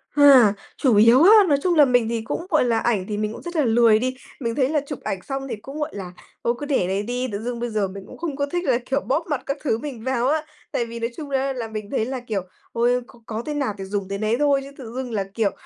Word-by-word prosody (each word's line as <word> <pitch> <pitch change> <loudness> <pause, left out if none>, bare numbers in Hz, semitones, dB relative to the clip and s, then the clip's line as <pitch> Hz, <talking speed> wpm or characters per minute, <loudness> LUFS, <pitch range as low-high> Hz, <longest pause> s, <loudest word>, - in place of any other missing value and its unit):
À, 265 -8 +7 0.2
chủ 250 -6 +3
yếu 230 +8 +7
á, 385 - +8 0.2
nói 285 -2 +4
chung 355 -2 +2
là 295 -2 +7
mình 245 -3 +2
thì 230 -1 -1
cũng, 335 +9 -4
gọi - - +3
là, 230 -2 +2
ảnh 215 -6 0
thì 210 -1 -3
mình 215 +1 -2
cũng - - -9
rất 345 0 -7
là 300 -4 +2
lười 225 -1 +5
đi. 255 +1 -1 0.2
Mình 230 -3 -2
thấy 265 -1 +2
là 300 -2 +1
chụp 285 - -5
ảnh 190 - -2
xong 270 0 -5
thì 230 - -3
cũng, 275 +8 -9
gọi 300 +1 -1
là, 185 -3 -6 0.3
thôi 235 - +2
cứ 290 - -4
để 265 -11 +1
đấy 195 +2 -1
đi, 250 +3 -2
tự 200 - -3
dưng 240 -1 -3
bây 240 0 -2
giờ 210 -3 0
mình 195 +1 -9
cũng - - -12
không 320 -5 -4
có 285 0 0
thích 350 +5 -3
là, 250 -3 +3
kiểu, 275 +1 0
bóp 315 +6 -1
mặt 290 -5 -1
các 275 +1 -2
thứ 225 -6 +1
mình 255 -5 -7
vào 260 -1 0
á. 310 +2 +2 0.3
Tại 235 - 0
vì 230 0 -7
nói 230 +1 -1
chung 295 -3 -6
á 270 0 0
là 235 -3 -4
mình 215 -1 -6
thấy 225 -5 0
là, 260 0 -4
kiểu, 220 -5 -3 0.3
ôi, 245 +2 +2
có 240 - -17
có 225 +1 -4
thế 300 - -3
nào 275 -8 -1
thì 195 - -6
dùng 195 0 -3
thế 200 - -2
nấy 215 +2 +1
thôi, 285 -2 +3
chứ 275 - -10
tự 235 -4 -9
dưng 260 -2 -4
là, 200 -3 0
kiểu, 220 -3 +1
245 Hz, 300 wpm, -23 LUFS, 220-275 Hz, 0.3 s, á